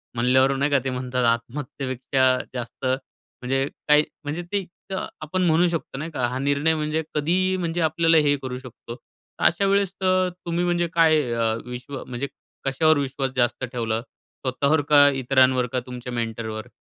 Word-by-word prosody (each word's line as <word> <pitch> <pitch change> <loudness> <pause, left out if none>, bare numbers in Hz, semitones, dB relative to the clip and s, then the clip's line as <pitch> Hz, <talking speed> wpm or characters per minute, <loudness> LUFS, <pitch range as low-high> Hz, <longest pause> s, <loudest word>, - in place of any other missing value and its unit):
म्हणल्यावर 130 +3 +3
नाही 140 +2 0
का 140 - +4
ते 135 - -1
म्हणतात 125 0 -2
आत्महत्येपेक्षा 130 +1 0 0.2
जास्त, 125 +1 -6
म्हणजे 130 0 -3 0.2
काय, 150 0 +6 0.2
म्हणजे 150 +4 -3
ते 200 -2 0 0.3
अ, - - 0 0.3
आपण 155 +5 -2
म्हणू 165 +2 +4
शकतो 165 -5 -4
नाही 155 +4 -5
का 130 -5 -1
हा 125 +2 -3
निर्णय 145 +3 +2
म्हणजे 155 +1 -1
कधीही 180 +5 +1
म्हणजे 170 -1 -2
आपल्याला 165 +1 +3
हे 145 0 +4
करू 125 -1 -4
शकतो. 125 -2 -10
तर - - -13
अशा 185 +4 +3
वेळेस 195 -1 +2
तर 185 0 +3 0.2
तुम्ही 170 +1 -1
म्हणजे 175 -1 +1
काय 160 -2 +5
अ, 115 -1 +1
विश्व 125 +2 -7
म्हणजे 125 +3 -4 0.4
कशावर 155 +3 +3
विश्वास 135 -1 -2
जास्त 120 +1 +1
ठेवला 115 -3 -2
स्वतःवर 140 +3 -2
का 145 -1 +8
इतरांवर 130 -1 +3
का 130 - +2
तुमच्या 125 0 -7
मेंटरवर? 115 -1 -4
135 Hz, 165 wpm, -24 LUFS, 125-160 Hz, 0.4 s, का